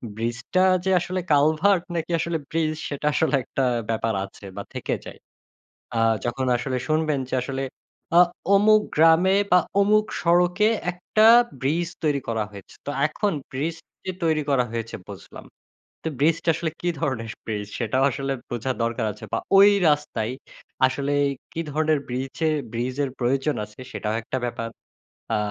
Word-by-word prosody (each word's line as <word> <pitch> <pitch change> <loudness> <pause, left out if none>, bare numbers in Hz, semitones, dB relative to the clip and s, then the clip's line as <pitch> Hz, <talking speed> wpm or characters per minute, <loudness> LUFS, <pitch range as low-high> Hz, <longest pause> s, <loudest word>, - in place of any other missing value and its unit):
ব্রিজটা 120 - 0 0.2
যে 190 - +2
আসলে 180 +2 -3
কালভার্ট 155 +6 +4
নাকি 165 +1 -2
আসলে 170 0 -1
ব্রিজ 155 -1 0 0.2
সেটা 145 0 -5
আসলে 155 -1 +2
একটা 135 - -2 0.3
ব্যাপার 115 0 0
আছে 100 +1 -14
বা - - -5
থেকে - - -2
যায়। - - -10 0.8
আ - - +2 0.2
যখন 125 +2 -1
আসলে 130 +1 -2
শুনবেন 155 -2 +1
যে - - -3
আসলে 135 +1 -3 0.6
আ - - +10 0.3
অমুক 215 +2 +6 0.2
গ্রামে 165 +4 +5
বা 180 - +7 0.2
অমুক 215 +1 +4 0.2
সড়কে 180 +4 +3 0.2
একটা 215 +5 +2 0.3
ব্রিজ 160 +6 0 0.2
তৈরি 145 -2 +2
করা 110 -2 0
হয়েছে। 100 -2 -12
তো 145 - -2 0.2
এখন 200 +6 -1 0.2
ব্রিজ 155 +5 -2 0.3
যে 185 - -1
তৈরি 155 -2 +2
করা 130 -3 +3
হয়েছে 115 0 -4
বুঝলাম, 100 -2 -10 0.6
তো - - -2
ব্রিজটা 165 +3 +2
আসলে 165 0 -2
কি 175 - -1
ধরনের 120 -7 -2 0.2
ব্রিজ! 105 -2 -3
সেটাও 130 +3 +1
আসলে 135 +1 -3 0.2
বোঝা 120 +2 -2
দরকার 115 -1 -1
আছে। - - -12
বা - - +1 0.2
ওই 200 +1 +9 0.2
রাস্তায় 135 -6 0 0.5
আসলেই 140 +2 0 0.3
কি 165 - -3
ধরনের 155 0 +2
ব্রিজে- 130 +5 -2 0.2
ব্রিজের 130 +4 -1
প্রয়োজন 135 +4 0
আছে? 105 +3 -15
সেটাও 105 0 -2
একটা 115 - -4
ব্যাপার। 115 -1 -3 0.7
আ 110 - +2
145 Hz, 155 wpm, -24 LUFS, 120-165 Hz, 0.8 s, আ